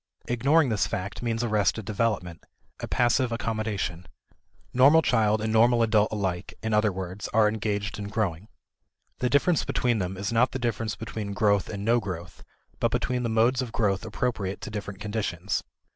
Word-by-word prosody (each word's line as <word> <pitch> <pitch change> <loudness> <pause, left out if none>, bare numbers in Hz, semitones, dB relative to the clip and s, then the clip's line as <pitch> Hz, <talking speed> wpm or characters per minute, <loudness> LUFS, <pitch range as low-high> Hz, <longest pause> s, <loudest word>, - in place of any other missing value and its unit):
Ignoring 135 +5 +3
this 105 -4 +1
fact 100 +2 -4
means 115 -1 -1
arrested 105 -2 +1
development, 100 -6 -2 0.4
a - - -5
passive 120 +1 +2
accommodation. 110 -6 -3 0.7
Normal 145 +6 +6
child 110 -3 +2
and 110 0 -1
normal 115 +1 +5
adult 110 -2 +3
alike, 95 -4 -3
in 110 0 -1
other 105 0 +3
words, 95 +1 -5
are 110 -1 +6
engaged 105 -2 -2
in 100 - -4
growing. 105 -4 -2 0.7
The 125 - +1
difference 150 +4 +3
between 120 -3 0
them 95 0 -3
is 100 +4 -3
not 120 +3 +3
the - - -1
difference 115 -3 -2
between 105 -2 -5
growth 100 -2 +2
and 100 -1 -5
no 120 +2 +4
growth, 90 -5 -7 0.4
but - - +2
between 125 0 -1
the 120 - -1
modes 115 +4 +3
of 125 -3 -5
growth 100 -4 0
appropriate 110 -3 -2
to - - -6
different 105 -2 -6
conditions. 105 -3 -2
110 Hz, 170 wpm, -26 LUFS, 100-115 Hz, 0.7 s, Normal